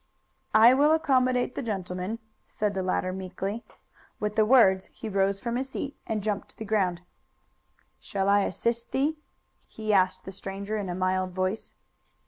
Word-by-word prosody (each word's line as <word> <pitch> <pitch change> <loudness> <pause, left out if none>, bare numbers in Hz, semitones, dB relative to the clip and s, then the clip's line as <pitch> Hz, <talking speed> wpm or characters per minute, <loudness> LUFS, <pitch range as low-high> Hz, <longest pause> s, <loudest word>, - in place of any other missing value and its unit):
"I 225 +3 +8
will 290 +4 +5
accommodate 255 -5 +2
the - - -4
gentleman," 190 -2 -3 0.3
said 210 -1 -1
the 190 - -1
latter 185 0 -1
meekly. 190 +4 -4 0.6
With 210 0 -2
the 215 -1 +3
words 195 -7 +5
he 225 - -8
rose 195 -1 +1
from 235 +3 -2
his 265 +1 -3
seat 275 +1 -5
and 215 -2 -2
jumped 205 -1 -2
to - - -16
the 220 - -6
ground. 190 -5 0 1.0
"Shall 195 -1 -2
I 200 +1 +5
assist 235 +4 -2
thee?" 300 +4 +1 0.5
he 215 -1 -2
asked 185 -1 +2
the 190 - -6
stranger 195 +2 -5
in 205 -3 -3
a 175 - -2
mild 185 0 0
voice. 185 +3 -2
205 Hz, 165 wpm, -27 LUFS, 190-235 Hz, 1.0 s, I